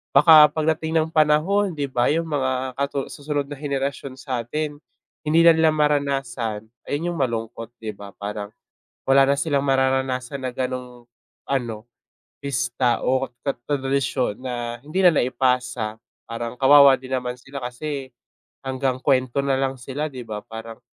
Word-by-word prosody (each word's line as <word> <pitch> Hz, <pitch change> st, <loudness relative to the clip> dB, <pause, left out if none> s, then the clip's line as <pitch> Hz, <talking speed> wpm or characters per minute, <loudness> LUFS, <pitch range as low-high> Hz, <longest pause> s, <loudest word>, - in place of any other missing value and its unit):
baka 150 Hz, +1 st, +9 dB
pagdating 160 Hz, +1 st, -1 dB
ng 160 Hz, -, -3 dB
panahon 165 Hz, +6 st, +3 dB
di 140 Hz, -2 st, -3 dB
ba 120 Hz, -1 st, +2 dB
yung 165 Hz, 0 st, -1 dB
mga 130 Hz, -3 st, -1 dB
katu 140 Hz, -1 st, -2 dB
susunod 145 Hz, -1 st, -3 dB
na 145 Hz, -, -6 dB
henerasyon 140 Hz, -1 st, -3 dB
sa'tin 135 Hz, +4 st, -4 dB, 0.5 s
hindi 160 Hz, +2 st, +4 dB
na 170 Hz, -, +8 dB
nila 160 Hz, -1 st, +4 dB
maranasan, 135 Hz, -7 st, -1 dB, 0.2 s
ayun 165 Hz, +5 st, -2 dB
yung 165 Hz, -, -6 dB
malungkot 115 Hz, -3 st, -2 dB, 0.2 s
di 110 Hz, -, -3 dB
ba? 100 Hz, -1 st, -11 dB
Parang 105 Hz, 0 st, -5 dB, 0.6 s
wala 135 Hz, 0 st, +6 dB
na 140 Hz, -, +3 dB
silang 140 Hz, -3 st, 0 dB
mararanasan 130 Hz, 0 st, 0 dB
na 125 Hz, -, -3 dB
gano'ng 125 Hz, -1 st, -4 dB, 0.5 s
ano, 120 Hz, -5 st, -1 dB, 0.6 s
pista 120 Hz, -2 st, 0 dB
o 130 Hz, +1 st, +1 dB, 0.2 s
tad 140 Hz, -, -1 dB
tradisyon 135 Hz, -5 st, 0 dB
na 120 Hz, -2 st, -4 dB
hindi 170 Hz, +6 st, -1 dB
na 180 Hz, -, +8 dB
naipasa 120 Hz, -3 st, 0 dB, 0.3 s
parang 115 Hz, +1 st, -4 dB
kawawa 140 Hz, 0 st, +8 dB
din 130 Hz, 0 st, -4 dB
naman 125 Hz, -1 st, -4 dB
sila 140 Hz, +1 st, -9 dB
kasi 135 Hz, +2 st, -5 dB, 0.6 s
hanggang 130 Hz, -1 st, -1 dB
kwento 130 Hz, -1 st, +2 dB
na 140 Hz, -, +2 dB
lang 135 Hz, 0 st, -1 dB
sila 140 Hz, +5 st, -4 dB
di 130 Hz, -3 st, -8 dB
ba, 105 Hz, -1 st, -5 dB
parang, 115 Hz, +1 st, -9 dB
135 Hz, 150 wpm, -23 LUFS, 125-145 Hz, 0.6 s, baka